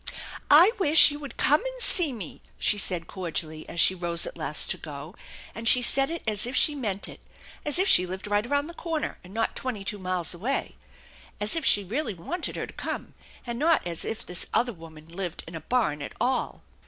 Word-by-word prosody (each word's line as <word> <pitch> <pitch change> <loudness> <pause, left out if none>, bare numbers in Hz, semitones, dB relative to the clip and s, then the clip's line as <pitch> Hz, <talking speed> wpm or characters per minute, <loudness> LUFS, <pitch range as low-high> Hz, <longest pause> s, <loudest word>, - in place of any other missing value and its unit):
" - - -12
I 335 +8 +8
wish 310 -4 +8
you 290 - -7
would 285 -2 -10
come 295 +7 +3
and - - -6
see 350 - +4
me/' 210 - -8 0.2
she 205 - +2
said 180 -4 -1
cordially 160 -4 -5
as 170 - -4
she 190 - +6
rose 175 -2 +2
at - - -7
last 155 -2 +2
to - - -1
go, 150 +2 -9 0.4
and 230 +1 -6
she 250 - +4
said 270 +3 +3
it 335 +1 -5
as 215 0 +1
if 255 - -5
she 300 - +5
meant 210 -9 -3
it, - - -11 0.4
as 295 +1 +3
if 380 +2 +2
she 180 - +5
lived 185 +2 -6
right 205 +2 0
around 285 +2 0
the 340 - -9
corner 330 -3 -4
and 180 - -14
not 225 +2 -2
twenty 240 -6 -5
two 205 +1 -3
miles 185 -2 -2
away, 230 +11 -3 0.6
as 210 +6 +3
if 325 - -2
she 205 - +3
really 220 - -3
wanted 330 - -4
her - - -4
to - - -14
come, - - -5 0.3
and 235 -1 -5
not 320 - +2
as 170 -2 -3
if 225 +1 -5
this 180 0 -1
other 240 0 +1
woman 160 -3 -14
lived 175 0 -6
in 165 - -10
a 165 - -7
barn 160 - -1
at - - -7
all. 255 +1 -1
210 Hz, 225 wpm, -26 LUFS, 175-285 Hz, 0.6 s, I